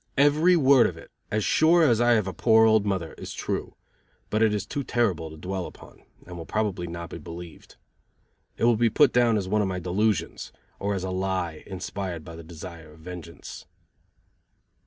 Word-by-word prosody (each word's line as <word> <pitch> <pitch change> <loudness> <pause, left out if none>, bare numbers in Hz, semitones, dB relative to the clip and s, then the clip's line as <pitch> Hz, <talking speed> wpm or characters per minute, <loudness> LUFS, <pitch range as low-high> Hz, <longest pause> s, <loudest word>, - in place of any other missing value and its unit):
Every 150 +6 +5
word 135 -5 +5
of - - -6
it, - - -14 0.2
as 105 -1 0
sure 165 +2 +4
as 120 -6 +4
I 120 0 +5
have 110 -4 +2
a 95 - -4
poor 110 -1 +5
old 110 -2 +4
mother, 95 -5 -2
is - - -7
true, - - -4 0.6
but 110 - +1
it 110 -1 +4
is 105 -2 -2
too 140 - -4
terrible 95 -11 0
to 80 - -11
dwell 95 +2 -4
upon, - - -15 0.2
and 90 - -9
will 85 -1 -7
probably 100 -5 -1
not 85 0 -7
be - - -7
believed. 85 +1 -10 0.8
It - - -4
will 120 -1 +4
be 115 +1 +3
put 140 +4 +4
down 120 -2 +4
as 95 -3 -2
one 105 +2 +1
of 100 - 0
my 95 -1 -3
delusions, 100 +4 -1 0.3
or 100 0 -1
as 95 - -3
a 95 - -3
lie 95 -4 -2
inspired 95 -3 -5
by 85 - -9
the 85 - -10
desire 80 -1 -10
of 80 - -18
vengeance. 85 -2 -9
95 Hz, 200 wpm, -26 LUFS, 85-115 Hz, 0.8 s, Every